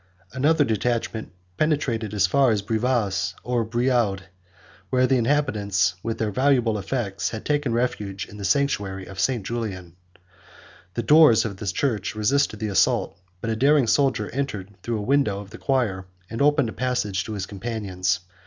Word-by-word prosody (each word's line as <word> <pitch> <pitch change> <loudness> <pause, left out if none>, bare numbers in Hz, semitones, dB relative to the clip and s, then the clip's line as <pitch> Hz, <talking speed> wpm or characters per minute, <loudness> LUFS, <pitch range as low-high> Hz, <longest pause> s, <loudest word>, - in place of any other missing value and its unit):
Another 145 +4 +3
detachment 115 -1 -2 0.3
penetrated 130 -8 0
as 100 -2 +4
far 135 +7 +3
as 105 -3 +1
Brivas, 110 -2 0
or 120 -1 0
Brioude, 115 -4 0 0.7
where 130 0 +3
the 130 0 +3
inhabitants, 105 -8 +1
with 115 0 -3
their 110 -2 -1
valuable 125 -3 +2
effects, 100 -1 -2
had 110 - -7
taken 145 -4 0
refuge 105 -5 -2
in 105 - -12
the 100 - -7
sanctuary 100 -4 0
of 95 0 -10
St. 120 -5 0
Julian. 95 -7 -5 1.0
The 120 - -1
doors 150 -5 +6
of 100 -3 -4
the 105 - -6
church 110 -2 -1
resisted 110 +1 +1
the 110 0 -2
assault; 95 -5 +2 0.3
but 115 - -2
a - - 0
daring 140 +3 +4
soldier 130 -4 +2
entered 105 -7 -4
through 115 -1 -2
a - - -3
window 130 -5 +1
of 100 0 -10
the 115 - -10
choir, 110 -9 0 0.2
and 115 - -3
opened 145 -4 +3
a - - -7
passage 105 -7 -1
to 110 - -5
his 100 -3 -3
companions. 95 -3 -2
115 Hz, 165 wpm, -24 LUFS, 100-130 Hz, 1.0 s, doors